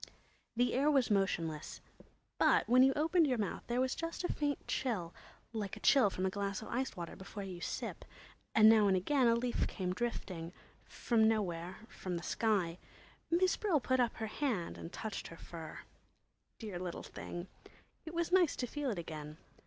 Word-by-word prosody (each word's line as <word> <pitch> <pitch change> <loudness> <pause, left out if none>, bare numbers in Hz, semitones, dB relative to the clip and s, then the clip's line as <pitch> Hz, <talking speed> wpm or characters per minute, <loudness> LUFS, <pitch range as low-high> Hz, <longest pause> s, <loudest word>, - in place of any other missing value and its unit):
The 245 +1 +2
air 275 +4 +3
was 270 -6 +3
motionless, 170 -6 0 0.6
but - - +4
when 250 +1 +6
you 265 +1 +7
opened 320 +2 +3
your 255 -3 +1
mouth 205 -3 -2
there 240 +1 0
was 260 0 +1
just 330 +2 -4
a - - 0
faint 290 -1 -2
chill, 200 -10 -1 0.4
like 210 -4 -3
a - - -9
chill 265 -8 +5
from 185 0 -2
a 190 - +1
glass 200 +1 -2
of - - -9
iced 255 -3 -2
water 170 -1 -5
before 200 +1 -7
you 185 -3 -7
sip, - - -4 0.5
and 215 0 +8
now 220 -2 +7
and 190 -1 +4
again 255 +7 +3
a 230 - +5
leaf 240 +1 0
came 180 -2 -2
drifting—from 210 +2 -2
nowhere, 185 -5 -1
from 180 -6 -5
the 170 - -6
sky. 185 -7 0 0.5
Miss 360 +2 +3
Brill 375 -8 +2
put 260 0 +1
up 240 -2 +2
her 225 - -3
hand 220 - -2
and 165 - -8
touched 220 -3 -5
her 165 - -11
fur. 165 -3 -8 0.8
Dear 210 -6 -6
little 180 -1 -5
thing! 175 0 -7 0.6
It 320 +1 -8
was 340 +1 0
nice 360 -4 +4
to 250 - -2
feel 285 +3 -3
it 215 - -2
again. 155 -2 -6
220 Hz, 185 wpm, -34 LUFS, 180-260 Hz, 0.8 s, and